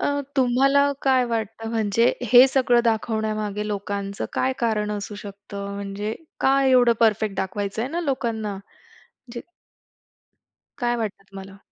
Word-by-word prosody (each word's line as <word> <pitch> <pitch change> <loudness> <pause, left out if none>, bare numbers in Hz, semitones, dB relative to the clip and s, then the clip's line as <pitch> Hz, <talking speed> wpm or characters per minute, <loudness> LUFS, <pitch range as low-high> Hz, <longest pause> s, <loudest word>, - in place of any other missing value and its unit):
अ, - - 0 0.3
तुम्हाला 270 +2 +3 0.2
काय 260 -2 +3
वाटतं 225 -1 -4
म्हणजे 225 +1 +2 0.2
हे 250 +2 +9
सगळं 255 -2 +3
दाखवण्यामागे 215 -2 -1
लोकांचं 200 -1 -4
काय 260 - 0
कारण 215 -3 0
असू 205 0 -5
शकतं? 200 0 -8
म्हणजे 200 +2 -4 0.3
काय 270 0 +3
एवढं 245 -2 +5
परफेक्ट 215 -3 +2
दाखवायचंय 200 +5 -3
ना 335 +4 -3
लोकांना? 230 - -2 0.8
जे 240 - -5 1.4
काय 240 -1 0
वाटतं 210 -3 -4
तुम्हाला? 195 0 -10
220 Hz, 125 wpm, -23 LUFS, 205-245 Hz, 1.4 s, हे